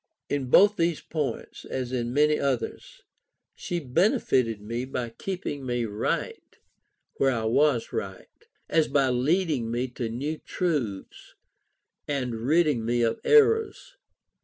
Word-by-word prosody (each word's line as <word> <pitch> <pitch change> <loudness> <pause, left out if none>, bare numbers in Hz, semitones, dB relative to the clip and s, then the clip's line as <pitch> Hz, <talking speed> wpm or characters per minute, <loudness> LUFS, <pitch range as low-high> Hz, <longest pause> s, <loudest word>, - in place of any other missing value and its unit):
In 145 -2 -1
both 205 +10 +6
these 170 -2 +1
points, 150 -4 -4
as 130 -2 -4
in 120 -2 -2
many 150 +3 +3
others, 135 -3 -3 0.5
she 175 - -4
benefited 130 - +1
me 115 +4 -4
as 130 - -5
much 135 - -17
by 120 -2 -2
keeping 180 -7 -4
me 120 -2 -1
right 105 -1 -3 0.6
where 135 - +3
I 115 -4 -1
was 125 +2 +2
right, - - -7 0.2
as 160 -2 +2
by 135 -2 +2
leading 140 0 +1
me 120 +2 -2
to 120 -2 -4
new 145 +7 -4
truths, 140 - -3 0.7
and 130 -4 -2
ridding 150 -6 +3
me 120 +1 +1
of 115 - 0
errors. 450 +2 +3
135 Hz, 135 wpm, -26 LUFS, 120-160 Hz, 0.7 s, both